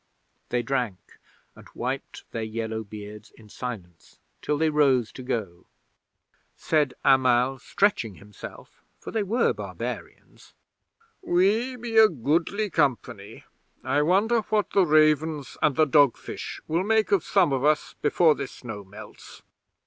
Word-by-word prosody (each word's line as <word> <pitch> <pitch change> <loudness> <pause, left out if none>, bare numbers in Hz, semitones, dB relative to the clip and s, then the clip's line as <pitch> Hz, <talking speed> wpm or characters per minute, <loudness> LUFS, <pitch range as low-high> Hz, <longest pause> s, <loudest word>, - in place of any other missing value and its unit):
'They 120 0 0
drank, 120 -7 -4 0.4
and - - -15
wiped - - -5
their 115 - -4
yellow 110 0 -4
beards 105 0 -10
in 110 - -16
silence 100 -8 -8 0.2
till 150 - -1
they 160 +1 +1
rose 135 -6 +2
to - - -10
go. 110 -9 -4 0.9
'Said 150 -5 0
Amal, 130 -1 +3
stretching 150 - 0
himself 105 +1 -12 0.2
(for - - -9
they 220 - 0
were 210 +5 +1
barbarians): - - -8 0.7
"We 210 +9 +1
be 230 -2 +1
a 220 -1 +8
goodly 170 - -1
company; 125 -9 -2 0.4
I 135 +3 +1
wonder 200 +9 +3
what 215 -1 0
the 190 -3 +3
ravens 155 -1 +2
and 140 - +2
the 155 - +4
dogfish 145 -3 +1
will 165 +3 0
make 220 0 +1
of 195 -5 +3
some 180 -8 +2
of 130 -1 -1
us 150 0 +1
before 155 +2 +4
this 140 -3 -6
snow 110 -5 -8
melts." 105 +3 -13
145 Hz, 135 wpm, -25 LUFS, 115-175 Hz, 0.9 s, a